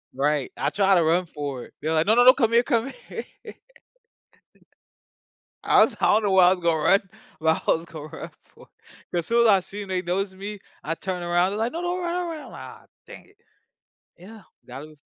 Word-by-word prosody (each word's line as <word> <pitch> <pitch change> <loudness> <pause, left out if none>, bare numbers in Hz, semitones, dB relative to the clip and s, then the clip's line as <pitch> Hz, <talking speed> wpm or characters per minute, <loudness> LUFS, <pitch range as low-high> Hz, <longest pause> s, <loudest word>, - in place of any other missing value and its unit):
Right, 145 0 0
I - - 0
try 195 -1 +2
to 170 - +3
run 170 +3 +2
for 145 -6 -6
it, - - -19
they're 155 - -2
like, 160 0 +2
"No 215 - +4
no 245 +1 +5
no, 255 - +9
come 230 -5 +1
here 235 - +5
come 240 0 -1 0.2
here." - - -6 2.4
I - - +5
was - - +1
I - - +2
don't 215 - +3
know 200 - +1
where 185 -1 +6
I 180 - +6
was 185 -1 0
gonna 165 -2 0
run, 195 +1 +5 0.4
but 160 0 +1
I - - +4
was 165 +1 -6
gonna 155 -2 -9
run - - -9
for - - -19
it, - - -34 0.2
'cause 175 - -1
as 160 - -11
soon 235 +1 +2
as - - +4
I 195 -2 +5
seen 200 +2 -9
they 185 -1 -2
noticed 190 +2 -2
me, 205 +2 -7 0.2
I 165 - -3
turn 185 -1 -5
around, 175 +2 +1
they're 210 - -4
like, 225 +2 -1
"No 335 - -4
no 350 - -3
don't 365 - -4
run 345 0 -2
don't 355 -1 -2
run." 315 - -6
I'm - - -12
like, - - -9 0.2
"Aw, - - -25 0.2
dang - - -12
it." 410 - -27 0.8
Yeah, 210 +5 -13 0.2
gotta 145 +5 -10
185 Hz, 240 wpm, -24 LUFS, 160-220 Hz, 2.4 s, no